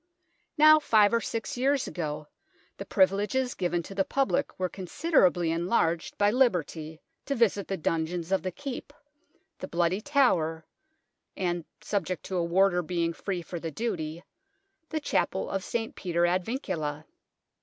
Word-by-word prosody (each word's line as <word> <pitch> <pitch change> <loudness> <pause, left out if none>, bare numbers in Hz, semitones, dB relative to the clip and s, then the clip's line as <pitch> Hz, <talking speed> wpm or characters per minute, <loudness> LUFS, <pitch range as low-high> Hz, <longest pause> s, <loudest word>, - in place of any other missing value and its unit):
Now 310 +1 +8
five 215 -6 +4
or 230 - +3
six 230 0 -4
years 270 +1 +2
ago, 150 -3 -4 0.5
the 195 - -7
privileges 205 +7 +2
given 175 -1 -1
to 195 - -9
the 195 0 +1
public 275 +4 0
were 185 - 0
considerably 180 - +1
en 170 +1 -1
larged 170 -6 0
by 205 0 +4
liberty 165 - 0 0.3
to 280 - 0
visit 210 -4 +2
the 195 - -2
dungeons 165 +2 -2
of 195 - +2
the 185 - -2
Keep, 280 +4 -7 0.7
the - - -5
Bloody 175 +3 0
Tower, 180 - +2 0.7
and 175 -3 -1 0.2
(subject 190 -4 -2
to 190 - -3
a 175 - +1
warder 180 +1 +3
being 170 -1 -1
free 180 0 -4
for 175 +1 -6
the 165 - -4
duty) 165 -4 -4 0.7
the 315 - -1
Chapel - - 0
of 195 -1 -2
St. 225 +1 -3
Peter 175 -2 0
ad 180 +1 +1
Vincula. 160 - -3
185 Hz, 155 wpm, -28 LUFS, 170-230 Hz, 0.7 s, Now